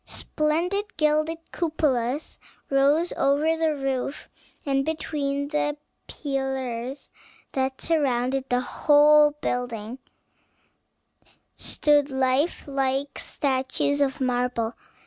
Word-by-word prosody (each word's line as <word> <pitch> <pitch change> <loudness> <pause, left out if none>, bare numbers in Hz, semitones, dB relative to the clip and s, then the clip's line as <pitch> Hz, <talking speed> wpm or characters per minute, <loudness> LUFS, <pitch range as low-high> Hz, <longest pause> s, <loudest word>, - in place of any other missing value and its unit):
Splendid 345 +7 -1
gilded 310 +1 +2
cupolas 295 -5 -1 0.3
rose 285 +5 +3
over 295 +4 +2
the 320 -2 +1
roof, 270 0 -3 0.4
and 275 -1 +1
between 285 -2 -2
the 295 -1 0 0.3
pillars 265 -2 -4 0.4
that 265 0 -1
surrounded 270 -4 0
the 245 0 +2
whole 295 +2 +5
building 245 -1 -3 1.5
stood 295 -1 +2
life 265 +4 +1
like 275 0 -1
statues 270 +1 0
of 270 -2 +1
marble. 245 -2 0
275 Hz, 90 wpm, -25 LUFS, 260-300 Hz, 1.5 s, whole